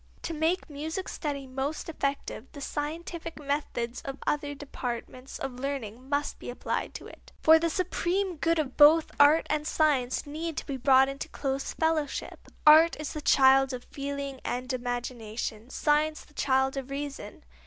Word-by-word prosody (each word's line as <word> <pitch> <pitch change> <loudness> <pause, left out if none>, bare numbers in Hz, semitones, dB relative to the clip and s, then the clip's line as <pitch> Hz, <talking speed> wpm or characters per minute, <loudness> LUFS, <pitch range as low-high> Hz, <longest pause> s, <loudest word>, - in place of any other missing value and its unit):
To 335 - -3
make 325 +4 0
music 320 +5 -4
study 285 -3 -4
most 270 +4 -3
effective 275 -5 -3
the 290 - -9
scientific 325 +4 -5
methods 280 -5 -2
of 275 0 -6
other 290 -1 -1
departments 255 -2 -6
of 250 -2 -5
learning 260 -2 -5
must 285 0 -1
be - - -7
applied 245 - -3
to - - -7
it. - - -14
For 320 +1 +8
the 335 +1 +1
supreme 365 +1 -1
good 330 +2 +1
of 285 -5 -2
both 310 +2 +7
art 290 +3 +6
and 305 0 -1
science 280 -6 +1
need 315 +2 -5
to - - -3
be 275 -3 -4
brought 265 +1 +5
into 275 +1 -5
close 270 -1 -3
fellowship. 320 -2 -1 0.2
Art 315 +2 +8
is 305 - -4
the 305 - -5
child 270 -1 +5
of 250 -1 -5
feeling 280 -1 -4
and 255 +2 -3
imagination; 240 -2 -4
science 305 +2 +1
the 300 - -23
child 265 -1 +1
of 270 -1 -4
reason. 275 -6 -6
285 Hz, 165 wpm, -28 LUFS, 265-310 Hz, 0.2 s, For